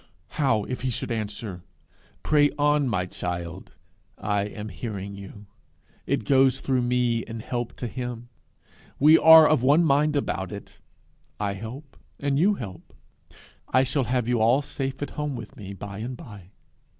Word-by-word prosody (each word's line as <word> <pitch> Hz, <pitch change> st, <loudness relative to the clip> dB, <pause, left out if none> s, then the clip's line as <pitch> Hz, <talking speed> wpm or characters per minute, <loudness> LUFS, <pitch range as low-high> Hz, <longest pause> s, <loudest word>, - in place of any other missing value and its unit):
How 120 Hz, -8 st, +1 dB
if 125 Hz, +3 st, -5 dB
he 130 Hz, -, -1 dB
should 120 Hz, -, -4 dB
answer, 105 Hz, -4 st, -4 dB, 0.6 s
'Pray 145 Hz, -1 st, +4 dB
on, 145 Hz, -1 st, +3 dB
my 90 Hz, -5 st, 0 dB
child; 90 Hz, 0 st, -6 dB, 0.4 s
I 100 Hz, 0 st, -1 dB
am 105 Hz, +1 st, -7 dB
hearing 100 Hz, -4 st, -6 dB
you; 100 Hz, +1 st, -10 dB, 0.6 s
it -, -, 0 dB
goes 135 Hz, 0 st, +4 dB
through 130 Hz, -2 st, 0 dB
me 120 Hz, -1 st, +1 dB
in 115 Hz, 0 st, -7 dB
help 120 Hz, +1 st, -4 dB
to -, -, -5 dB
him. 120 Hz, 0 st, -5 dB, 0.7 s
We 155 Hz, +3 st, +7 dB
are 160 Hz, -1 st, +9 dB
of 155 Hz, -5 st, +3 dB
one 145 Hz, +6 st, +5 dB
mind 150 Hz, 0 st, +3 dB
about 95 Hz, -9 st, -2 dB
it; 100 Hz, -1 st, -10 dB, 0.6 s
I 100 Hz, -1 st, -1 dB
help 120 Hz, +8 st, -9 dB, 0.2 s
and 140 Hz, 0 st, 0 dB
you 200 Hz, +5 st, +4 dB
help. 95 Hz, -, -9 dB, 0.7 s
I 130 Hz, +1 st, +4 dB
shall 135 Hz, 0 st, 0 dB
have 125 Hz, -1 st, 0 dB
you 120 Hz, -2 st, +1 dB
all 120 Hz, +6 st, +4 dB
safe 135 Hz, -1 st, -4 dB
home 145 Hz, -1 st, -3 dB
with 115 Hz, +2 st, -9 dB
me 100 Hz, -6 st, -8 dB
by 100 Hz, 0 st, -7 dB
and 120 Hz, +3 st, -5 dB
by! 100 Hz, -7 st, -12 dB
120 Hz, 160 wpm, -25 LUFS, 105-140 Hz, 0.7 s, are